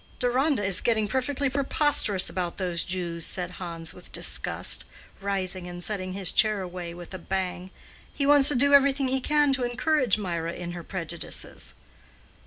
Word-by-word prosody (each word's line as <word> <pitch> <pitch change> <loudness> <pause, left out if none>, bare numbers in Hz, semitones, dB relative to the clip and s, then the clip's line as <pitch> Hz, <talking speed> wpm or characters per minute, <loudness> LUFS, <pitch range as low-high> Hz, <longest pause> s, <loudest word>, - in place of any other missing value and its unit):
"Deronda 255 0 +1
is 190 -2 +2
getting 220 -3 +1
perfectly 265 +4 -1
preposterous 270 -7 +3
about 180 -2 -3
those 175 -3 -1
Jews," 175 -2 -4
said 180 +1 -3
Hans 170 -3 -5
with 180 - -14
disgust, - - 0 0.4
rising 190 -2 -2
and 175 0 -5
setting 185 -3 -4
his 190 -2 +1
chair 215 -2 +2
away 180 -2 -6
with 175 +1 -11
a 185 - -6
bang. 185 0 -3 0.4
"He 280 - -2
wants 285 -1 +7
to 290 - +4
do 280 +3 +3
everything 275 -1 +4
he 265 0 0
can 295 0 +2
to 260 -2 +1
encourage 245 -1 +1
Mirah 170 -4 -3
in 175 -1 -6
her 175 -1 -7
prejudices." 170 -2 -4
195 Hz, 165 wpm, -26 LUFS, 180-265 Hz, 0.4 s, wants